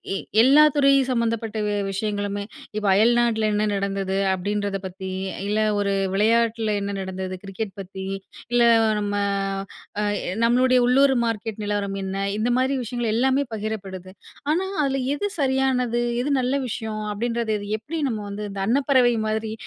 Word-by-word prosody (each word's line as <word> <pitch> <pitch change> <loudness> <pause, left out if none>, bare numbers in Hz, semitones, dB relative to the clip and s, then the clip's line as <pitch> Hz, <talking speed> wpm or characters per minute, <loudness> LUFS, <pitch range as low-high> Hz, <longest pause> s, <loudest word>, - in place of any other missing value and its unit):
எ - - 0 0.2
எல்லா 280 +5 +7
துறை 275 -1 +5 0.2
சம்பந்தப்பட்ட 230 -2 -1
வி 205 - 0 0.2
விஷயங்களுமே 205 0 -2 0.3
இப்போ 210 -1 -1
அயல்நாட்டில 225 +1 +3
என்ன 210 - +1
நடந்தது 195 -1 -2 0.2
அப்படின்றத 200 +1 -2
பத்தி, 190 +1 -6 0.4
இல்ல 210 +1 0 0.2
ஒரு 200 -1 0 0.2
விளையாட்டில 225 +1 +2
என்ன 200 0 -3
நடந்தது. 190 0 -4
கிரிக்கெட் 195 +1 -5
பத்தி, 190 0 -7 0.5
இல்ல 240 - +3 0.4
நம்ம 205 0 -2 0.9
அ - - 0 0.4
நம்மளுடைய 255 +2 +4
உள்ளூர் 270 +2 +4
மார்க்கெட் 225 -1 -3
நிலவரம் 205 -1 -2
என்ன 190 0 -4 0.2
இந்த 230 +3 0
மாரி 260 +2 +1
விஷயங்கள் 240 -1 -2
எல்லாமே 265 +4 +2
பகிரப்படுது. 195 -4 -5 0.4
ஆனா 370 +4 0 0.2
அதில 270 -1 0
எது 410 +8 -2
சரியானது? 260 -3 +1 0.2
எது 275 - -2
நல்ல 250 +1 0
விஷயம். 220 -2 -4
அப்படின்றது 230 +1 -1
இது 205 - -7
எப்படி 320 +8 -5
நம்ம 220 -2 -3
வந்து, 210 +1 -5
இந்த 195 0 -5
அன்னப்பறவை 255 -1 +3
மாதிரி 220 0 -2
220 Hz, 145 wpm, -23 LUFS, 200-245 Hz, 0.9 s, எல்லா